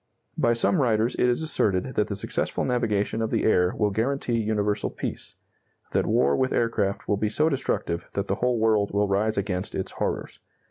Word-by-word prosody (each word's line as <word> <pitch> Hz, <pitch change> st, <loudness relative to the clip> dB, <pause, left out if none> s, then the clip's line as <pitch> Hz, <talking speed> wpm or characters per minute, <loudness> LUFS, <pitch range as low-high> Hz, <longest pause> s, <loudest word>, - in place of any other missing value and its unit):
By 120 Hz, -, +2 dB
some 140 Hz, +7 st, +2 dB
writers 115 Hz, -1 st, +2 dB
it 125 Hz, -, +2 dB
is 120 Hz, +6 st, 0 dB
asserted 95 Hz, -11 st, 0 dB
that -, -, +1 dB
the -, -, -3 dB
successful -, -, -2 dB
navigation 110 Hz, -3 st, 0 dB
of 110 Hz, -, -1 dB
the -, -, 0 dB
air 90 Hz, -4 st, +3 dB
will 105 Hz, -1 st, +1 dB
guarantee 120 Hz, +2 st, 0 dB
universal 105 Hz, -1 st, 0 dB
peace; -, -, -6 dB, 0.6 s
that -, -, +1 dB
war 70 Hz, +1 st, +3 dB
with 130 Hz, 0 st, +1 dB
aircraft 105 Hz, -4 st, 0 dB
will 105 Hz, -, +1 dB
be 105 Hz, +1 st, 0 dB
so 155 Hz, +8 st, +2 dB
destructive 85 Hz, -, -2 dB
that 100 Hz, -, -1 dB
the 100 Hz, 0 st, -2 dB
whole 125 Hz, -1 st, +2 dB
world 110 Hz, -2 st, +2 dB
will 100 Hz, +1 st, +1 dB
rise 105 Hz, +3 st, 0 dB
against 95 Hz, -1 st, -2 dB
its 95 Hz, -, -3 dB
horrors. -, -, -3 dB
110 Hz, 190 wpm, -25 LUFS, 100-120 Hz, 0.6 s, air